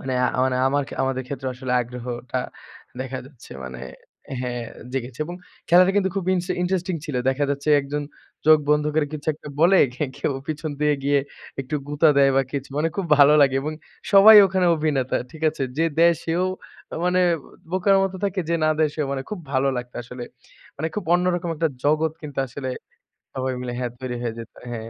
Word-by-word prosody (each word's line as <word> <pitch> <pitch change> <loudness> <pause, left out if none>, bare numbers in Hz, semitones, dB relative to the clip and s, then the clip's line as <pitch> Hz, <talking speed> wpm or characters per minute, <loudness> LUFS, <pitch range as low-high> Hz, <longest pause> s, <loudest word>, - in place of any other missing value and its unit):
মানে 130 - -4 0.3
আমান 130 0 +2 0.2
আমার 145 +1 0 0.2
আমাদের 130 -1 -1
ক্ষেত্রে 135 -1 -4
আসলে 130 0 -4
আগ্রহটা 125 +1 -5 0.6
দেখা 130 0 -4
যাচ্ছে, 135 -4 -14
মানে 65 -1 -8 0.6
হ্যাঁ 125 -1 -3 0.3
জেগেছে। 130 0 -4
এবং 175 - -6 0.3
খেলাটা 180 +2 +6
কিন্তু 195 -2 +3
খুব 195 - -1
ইন্স 180 -1 -2 0.2
ইন্টারেস্টিং 180 0 -1
ছিল। 150 -5 -3
দেখা 140 +2 0
যাচ্ছে 140 +1 -3
একজন 145 +1 -4 0.4
চোখ 155 0 +8
বন্ধ 150 0 +3
করে 155 -1 +2
কিছু 150 -1 -7
একটা 150 - -11
বলে 175 +4 +6 0.4
কেউ - - -1
পিছন 155 0 -4
দিয়ে 150 0 +3
গিয়ে 140 0 +3 0.4
একটু 135 +3 -5
গুতা 150 +2 +3
দেয় 135 -1 +5
বা 135 - +5
কিছু। 140 -1 -4
মানে 160 +2 +2
খুব 195 - -1
ভালো 145 +1 +7
লাগে 135 -1 +3
এবং 155 +2 -3 0.4
সবাই 205 +2 +10
ওখানে 190 -1 +1
অভিনেতা। 145 -5 0 0.2
ঠিক 160 - -12
আছে? 150 - -6 0.2
যে 165 - +3
দেয় 170 +1 +6
সেও 170 +2 0 0.6
মানে 180 0 +2 0.5
বোকার 190 +1 +3
মতো 190 0 -3
থাকে 195 -1 -1
যে 170 - +1
না 155 - +4
দেয় 155 -1 +3
সেও। 150 -3 -1
মানে 135 -1 -3
খুব 210 - -4
ভালো 135 0 +2
লাগতো 125 0 -6
আসলে। 125 +1 -8 0.5
মানে 160 +3 -2
খুব 210 - -3
অন্যরকম 175 -1 0
একটা 165 +1 +1 0.2
জগৎ 155 +1 +2
কিন্তু 145 -3 -8
আসলে 130 +1 -5 0.6
সবাই 130 -1 -2
মিলে 125 -1 -4
হ্যাঁ 125 -1 -2
তৈরি 130 -2 -4
হয়ে 120 -2 -2
যেত। 115 - -9 0.2
হ্যাঁ। 115 -1 -6
145 Hz, 185 wpm, -23 LUFS, 130-170 Hz, 0.6 s, সবাই